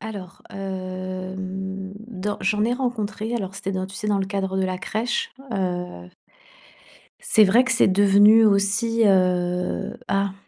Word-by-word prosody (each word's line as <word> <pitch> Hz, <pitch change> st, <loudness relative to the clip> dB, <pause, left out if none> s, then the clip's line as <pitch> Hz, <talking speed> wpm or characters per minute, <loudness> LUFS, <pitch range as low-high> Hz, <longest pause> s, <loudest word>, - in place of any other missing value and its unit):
Alors, 200 Hz, -4 st, -8 dB
hem, 190 Hz, 0 st, -5 dB
dans 205 Hz, -3 st, -4 dB
j'en 210 Hz, +2 st, +1 dB
ai 240 Hz, +2 st, +1 dB
rencontré, 225 Hz, -3 st, -3 dB
alors 195 Hz, -5 st, -4 dB
c'était 195 Hz, 0 st, -4 dB
dans 185 Hz, 0 st, -2 dB
tu 195 Hz, -, -12 dB
sais 210 Hz, +2 st, -4 dB
dans 205 Hz, -1 st, +2 dB
le 195 Hz, -, -1 dB
cadre 190 Hz, -1 st, -2 dB
de 190 Hz, -, +1 dB
la 185 Hz, 0 st, -2 dB
crèche, 240 Hz, -, -2 dB, 0.2 s
heu 180 Hz, -, -3 dB, 1.1 s
c'est 215 Hz, -, +4 dB
vrai 230 Hz, +6 st, +4 dB
que 260 Hz, -, 0 dB
c'est 230 Hz, -, +4 dB
devenu 205 Hz, +3 st, +6 dB
aussi, 215 Hz, +3 st, +2 dB
heu 180 Hz, 0 st, +1 dB
ah, 195 Hz, 0 st, 0 dB
195 Hz, 150 wpm, -23 LUFS, 185-215 Hz, 1.1 s, devenu